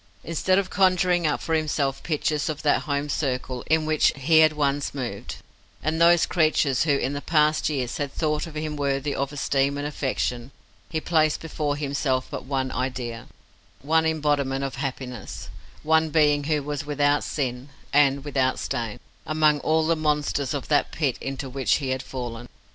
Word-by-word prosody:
Instead 175 +3 +1
of 195 -1 0
conjuring 180 -2 +3
up 150 - 0
for 165 - -2
himself 150 -3 0
pictures 155 -1 -1
of 155 0 -4
that 145 - +3
home 145 +1 0
circle 130 -3 -2
in 160 -1 +2
which 155 -1 +3
he 155 +4 +4
had 155 -1 +6
once 145 -1 -1
moved, 120 -4 -5 0.5
and 160 +2 0
those 170 0 +6
creatures 155 -5 +2
who 145 -3 +3
in 135 0 -1
the 145 - -4
past 155 -1 +2
years 130 -5 -2
had 145 -2 -3
thought 150 0 -1
him 155 -1 -4
worthy 140 0 -1
of 140 +1 -2
esteem 140 -1 0
and 145 - -3
affection, 130 -4 -2 0.4
he 160 - -1
placed 155 -2 +2
before 150 -2 -2
himself 140 -2 -1
but - - -5
one 130 -1 -1
idea, 125 -3 -4 0.6
one 160 +2 +3
embodiment 145 -4 0
of 135 - -3
happiness, 130 -2 -5 0.3
one 160 +1 +3
being 150 -2 +3
who 150 -1 0
was 145 0 -3
without 145 0 +1
sin 130 -1 -3 0.2
and 140 -1 +3
without 130 -3 +1
stain, 115 0 -3 0.3
among 155 -1 +3
all 160 +2 +1
the 165 +1 +2
monsters 150 -2 0
of 140 - -4
that 145 -1 +2
pit 140 -6 0
into 135 0 -4
which 130 0 +1
he 135 -3 -2
had 130 0 -1
fallen. 120 -2 -6
145 Hz, 170 wpm, -25 LUFS, 135-155 Hz, 0.6 s, had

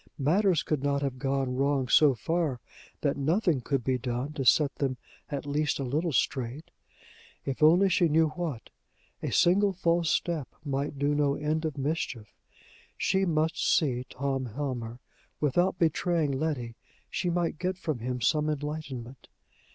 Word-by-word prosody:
Matters 175 +4 +2
could 150 -4 -1
not 140 0 0
have 130 -2 -3
gone 135 -2 -1
wrong 135 -1 +1
so 145 +1 +5
far 160 -2 -1 0.4
that 140 -2 0
nothing 160 - +1
could 135 0 -1
be 130 +1 0
done 125 +4 -3
to 145 -3 -3
set 140 +4 +4
them 135 -3 -1 0.3
at 145 -1 -4
least 145 +1 0
a 140 - -3
little 155 +6 -1
straight! 130 +3 -1 0.7
If 135 +1 -3
only 170 +6 +6
she 180 -2 +3
knew 160 +1 +3
what! 150 -6 -5 0.5
A - - -3
single 195 +3 +4
false 170 -2 +1
step 160 -5 0 0.2
might 140 +1 -2
do 145 +1 +1
no 145 -1 +2
end 155 +2 -1
of 155 -3 -3
mischief! 135 - -3 0.6
She 190 0 +1
must 160 -1 0
see 130 -5 +1
Tom 135 -1 -2
Helmer: 120 -2 -4 0.4
without 175 +6 +2
betraying 165 -2 +1
Letty, 135 -4 -2 0.4
she 180 - -1
might 170 -2 -1
get 185 +1 -1
from 155 -8 -3
him 125 +1 -3
some 150 +6 +2
enlightenment. 145 -4 -5
145 Hz, 155 wpm, -28 LUFS, 130-160 Hz, 0.7 s, only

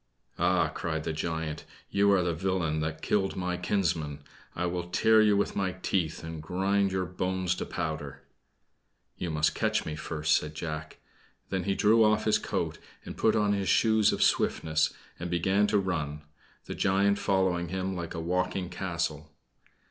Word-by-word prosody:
"Ah!" 90 +1 +3
cried 80 -2 -3
the 80 - -2
giant; 80 -1 -3 0.3
"you 100 0 +4
are 95 -2 +4
the 85 -1 0
villain 85 -2 -1
that 80 0 -3
killed 95 -2 +1
my 90 -1 -2
kinsmen! 80 -6 -1 0.3
I 90 - -1
will 90 0 -2
tear 110 +4 +5
you 105 -2 +4
with 100 - 0
my 95 -2 0
teeth, 90 -4 -2
and 80 -1 -6
grind 95 +4 +1
your 95 -1 -1
bones 90 0 -1
to - - -4
powder!" 80 -3 -4 1.0
"You 90 - -2
must 75 -1 +1
catch 110 -1 0
me 75 - -4
first!" 75 0 0
said 75 0 -2
Jack. 75 -1 -5 0.5
Then 95 -1 -2
he 100 -1 +1
threw 110 +2 +5
off 110 0 +3
his 110 - +3
coat - - -3 0.3
and - - -7
put 110 - +2
on 105 -1 +2
his 100 -1 -1
shoes 110 -2 +4
of - - +1
swiftness, 80 -1 +2 0.3
and 90 - -4
began 95 +4 +2
to 105 0 +2
run, 80 -6 -2 0.4
the - - -5
giant 100 +1 +2
following 95 -3 +1
him 95 +2 -3
like 85 -1 -5
a - - -3
walking 90 +2 -1
castle. 85 -5 -3
90 Hz, 170 wpm, -29 LUFS, 80-100 Hz, 1.0 s, tear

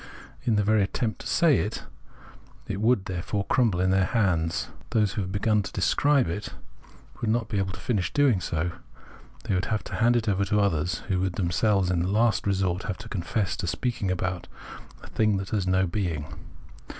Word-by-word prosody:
In 115 -4 +2
the 105 - +2
very 110 +1 +3
attempt 110 +3 -2
to - - -6
say 155 +3 +4
it, 105 - -3 0.8
it 100 +1 -3
would, 110 -3 +3
therefore, 95 +3 -3
cruinble 110 -7 +2
in 95 +1 +2
their 95 0 +3
hands; 90 -7 0 0.2
those 105 -4 +1
who 105 - -2
have 95 -1 -4
begun 105 +2 +2
to - - -6
describe 140 +9 +2
it 85 +5 -4 0.7
would 115 - 0
not 115 0 0
be 100 - 0
able 95 -1 -1
to - - -9
finish 100 -9 -1
doing 135 -10 +3
so: 85 +1 -1 0.7
they - - -1
would 90 +1 0
have 110 -1 -1
to - - -6
hand 120 +1 +4
it 115 -1 0
over 100 -1 +2
to 105 +2 +1
others, 90 -4 0
who 95 -4 0
would 95 -1 0
themselves 95 +1 +1
in 90 - +1
the 90 - 0
last 110 +2 +2
resort 95 -2 0
have 100 - -3
to 105 +2 -10
confess 95 0 -1
to 90 - -3
speaking 100 +4 -2
about 90 0 -2 0.6
a - - -10
thing 110 -2 +1
that 95 -1 -5
has 100 -4 0
no 95 +1 +3
being. 85 -5 -2
100 Hz, 200 wpm, -26 LUFS, 90-110 Hz, 0.8 s, say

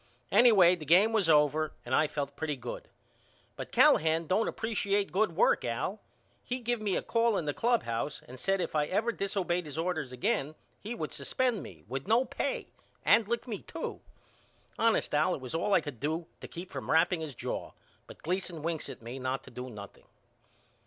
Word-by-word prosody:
Anyway 200 -8 +7
the 175 -4 -5
game 185 +9 +5
was 200 -7 +2
over 150 0 +3
and 120 - -4
I 155 +3 +4
felt 140 -1 -4
pretty 150 0 -2
good. 125 -2 -7 0.7
But - - -7
Callahan 160 +1 +4
don't 195 +7 +1
appresiate 205 -3 -1
good 195 -3 +1
work - - +3
Al. 125 - -2 0.4
He 250 +1 -3
give 240 -1 -1
me 205 -3 0
a - - -1
call 230 -2 +2
in 160 - -2
the 145 - -1
clubhouse 150 - 0
an 130 - -10
said 195 +7 0
if - - -3
I 150 -1 +1
ever 220 +7 +1
disobeyed 185 -5 -1
his 145 0 -8
orders 160 -5 -2
again 135 +4 -1 0.3
he 225 +4 -5
would - - -4
suspend 250 -5 0
me - - -11
without 135 - -5
no 235 +4 +4
pay - - -3 0.4
and 225 -3 +5
lick 235 +2 -2
me 215 -4 -4
too. - - -6 0.8
Honest 230 -7 +2
Al 155 +5 +3
it - - -7
was 130 +2 -6
all 170 +6 0
I - - +4
could 145 -7 -7
do 160 +4 -2
to - - -8
keep 180 +2 -9
from - - -6
wrapping 165 +1 +3
his 150 -5 -5
jaw - - -4 0.3
but - - -13
Gleason 175 -2 -2
winks 165 -1 -2
at - - -9
me 120 +3 -6
not 130 +1 -2
to - - -13
do 125 +1 -7
nothing. 105 -3 -11
170 Hz, 195 wpm, -30 LUFS, 145-205 Hz, 0.8 s, Anyway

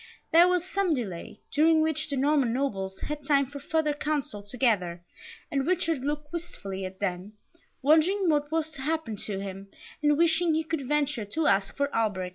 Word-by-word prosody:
There 340 +2 +7
was 360 -1 +1
some 375 -3 +1
delay, 205 -5 -6
during 315 +2 +4
which 315 -1 -1
the 280 - -2
Norman 275 -3 +3
Nobles 195 -7 -2
had 300 0 -4
time 280 -2 +3
for 285 +2 -9
further 305 +1 0
counsel 290 -8 -2
together, 205 -6 0 0.5
and 275 -1 0
Richard 330 -4 +1
looked 295 +2 -3
wistfully 200 - -5
at 185 0 -8
them, 190 +1 -3 0.5
wondering 330 +7 +4
what 295 -2 +1
was 320 -1 0
to 280 - -8
happen 310 -5 -1
to 200 -1 -4
him, 195 0 -6 0.3
and 295 -1 +3
wishing 330 0 +3
he 320 - +1
could 315 -4 -3
venture 290 -5 0
to 310 +10 -2
ask 195 -3 +2
for 280 0 -1
Alberic. 205 -5 0
285 Hz, 180 wpm, -28 LUFS, 210-315 Hz, 0.5 s, There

